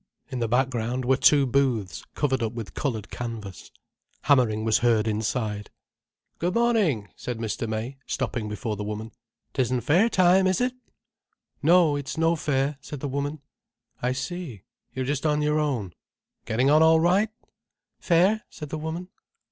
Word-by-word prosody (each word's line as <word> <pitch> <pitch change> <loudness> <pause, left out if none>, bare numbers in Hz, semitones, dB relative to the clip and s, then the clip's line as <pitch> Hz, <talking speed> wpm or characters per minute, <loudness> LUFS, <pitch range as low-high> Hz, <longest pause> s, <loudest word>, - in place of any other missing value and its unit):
In 130 - -3
the 115 - 0
background 125 0 0
were 130 +2 +4
two 140 +1 +5
booths 125 -7 0
covered 135 -3 0
up 110 0 -1
with 115 -3 -7
coloured 110 -7 -3
canvas. 110 -6 -6 0.5
Hammering 115 -6 +3
was 110 -1 +3
heard 115 -2 +2
inside. 105 -1 -2 0.7
"Good 175 +2 -1
morning!" 210 - +2
said 125 -2 -5
Mr. 115 0 -3
May, 115 +5 -4
stopping 120 -4 -2
before 105 +1 -3
the 105 - -5
woman. 105 +2 -5 0.4
"'Tisn't 130 -2 0
fair 180 +10 +4
time, 185 -1 +4
is 185 - +1
it?" 250 0 +1 0.9
"No, 165 -1 +5
it's 145 +2 -5
no 165 +1 +3
fair," 140 -2 -1
said 145 - -7
the 145 - -3
woman. 140 +2 -3 0.6
"I 125 - +1
see. 130 - -5 0.3
You're 130 0 -3
just 140 +1 -2
on 150 0 +1
your 150 +1 +2
own. 125 - -1 0.5
Getting 125 +5 +2
on 155 +1 +6
all 160 0 +6
right?" 185 +6 +3 0.7
"Fair," 190 +5 +3
said 150 -3 -9
the 155 - -4
woman. 165 +4 -5
135 Hz, 155 wpm, -25 LUFS, 115-160 Hz, 0.9 s, on